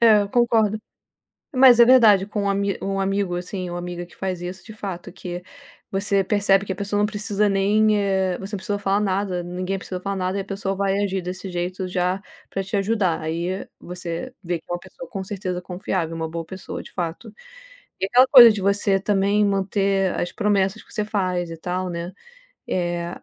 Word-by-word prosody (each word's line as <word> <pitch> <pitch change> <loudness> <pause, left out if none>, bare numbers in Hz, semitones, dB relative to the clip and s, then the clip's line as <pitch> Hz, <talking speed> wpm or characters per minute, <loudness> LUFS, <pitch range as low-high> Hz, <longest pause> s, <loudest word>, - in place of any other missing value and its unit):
É, 220 -3 +7
eu 200 - -4
concordo. 225 -3 +2 0.8
Mas 255 -2 +7
é 235 - +9
verdade, 225 -6 +6
com 205 -1 -2
um 200 0 +1 0.2
um 195 0 -2
amigo 195 -2 0
assim 180 +1 -4
ou 175 - -4
amiga 175 0 -5
que 175 - -19
faz 185 -2 -3
isso, 180 +2 -6
de 220 - -11
fato, 185 -4 -6
que 180 -1 -7 0.5
você 195 0 +1
percebe 195 -1 +3
que 190 - -4
a - - -2
pessoa 205 +1 -1
não 210 - +3
precisa 210 -1 0
nem, 210 +2 +3
eh 190 -2 +1
você 200 +2 -8
não - - -3
precisou 205 +2 -2
falar 200 0 +1
nada, 195 -2 -1
ninguém 180 +2 -3
precisou 185 -1 -6
falar 200 +1 -3
nada 185 +1 -1
e - - 0
a 195 - -8
pessoa 195 0 -3
vai 195 0 0
agir 190 -1 -1
desse 185 +1 -5
jeito 180 +1 -3
já 180 +1 -1 0.3
para 195 - -2
te 195 +2 -2
ajudar, 195 -4 +1
aí 170 +4 -3
você 175 -1 -6
vê 170 -1 -2
que - - -31
é 175 - -2
uma 175 - -2
pessoa - - -11
com 195 -3 -4
certeza 185 -2 -4
confiável, 180 -2 -3
uma 160 0 -3
boa 165 0 -5
pessoa 190 +3 -7
de - - -14
fato. 180 +5 -5 0.7
E 195 - +2
aquela 250 +5 +5
coisa 240 -4 +10
de 210 -2 -3
você 200 0 +2
também 200 +1 +2
manter 195 -1 +1
as 175 - -2
promessas 205 -1 0
que - - -15
você 210 - 0
faz 185 -4 -1
e 165 - -7
tal, 180 +2 -3
né, 170 +1 -5 0.5
eh, 175 -1 -1
195 Hz, 205 wpm, -23 LUFS, 180-205 Hz, 0.8 s, coisa